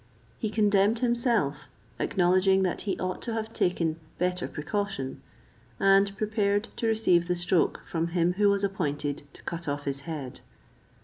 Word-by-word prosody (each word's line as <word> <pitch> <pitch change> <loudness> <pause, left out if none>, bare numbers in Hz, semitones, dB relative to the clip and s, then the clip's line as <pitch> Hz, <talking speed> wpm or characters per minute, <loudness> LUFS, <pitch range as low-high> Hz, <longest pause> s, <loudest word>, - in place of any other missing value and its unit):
He 220 - -1
condemned 210 0 +3
himself, 235 - 0 0.3
acknowledging 185 +1 +3
that 185 - -1
he - - 0
ought 185 0 -3
to 235 - -4
have 225 0 -4
taken 165 -5 0 0.2
better 180 0 0
precaution, 195 -5 -3 0.6
and 195 0 +4
prepared 210 0 0
to 230 - 0
receive 200 -6 +3
the 180 - +1
stroke 175 0 +1
from 165 0 -1
him 170 +1 +1
who 205 +2 +3
was 200 0 +1
appointed 145 -7 -2
to - - -13
cut 170 -1 -5
off 145 0 -2
his 140 -1 -3
head. 140 -6 -5
190 Hz, 150 wpm, -28 LUFS, 170-205 Hz, 0.6 s, and